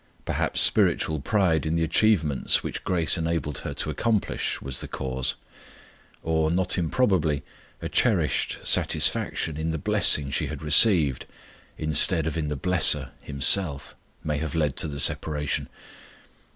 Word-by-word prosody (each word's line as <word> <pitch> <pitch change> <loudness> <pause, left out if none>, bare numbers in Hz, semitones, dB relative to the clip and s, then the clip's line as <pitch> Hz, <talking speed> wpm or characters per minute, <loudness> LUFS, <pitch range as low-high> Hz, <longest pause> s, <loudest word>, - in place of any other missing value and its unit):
Perhaps - - -2
spiritual 80 -1 +1
pride 85 -1 0
in 80 +1 -2
the 85 - 0
achievements 80 -4 +1
which - - -6
grace 85 -2 0
enabled 80 -4 -3
her - - -6
to 75 - -4
accomplish 110 +7 -2
was 65 -2 -3
the - - -6
cause; 65 -1 -2 0.9
or, 80 -1 0
not 90 +2 0
improbably, 85 - 0 0.4
a - - -3
cherished - - 0
satisfaction 80 -2 +2
in 80 +1 -3
the 80 - -3
blessing 70 -1 +2
she - - -2
had 75 0 -8
received, 75 - +4 0.5
instead 80 +2 +2
of 80 - -3
in 80 -2 -3
the 75 - -3
BLESSER 75 -4 +2
Himself, 70 +2 +1 0.3
may 75 -1 -3
have 80 +2 -5
led 75 -4 -1
to - - +1
the 70 -1 -7
separation. 75 0 -1
80 Hz, 140 wpm, -24 LUFS, 75-85 Hz, 0.9 s, received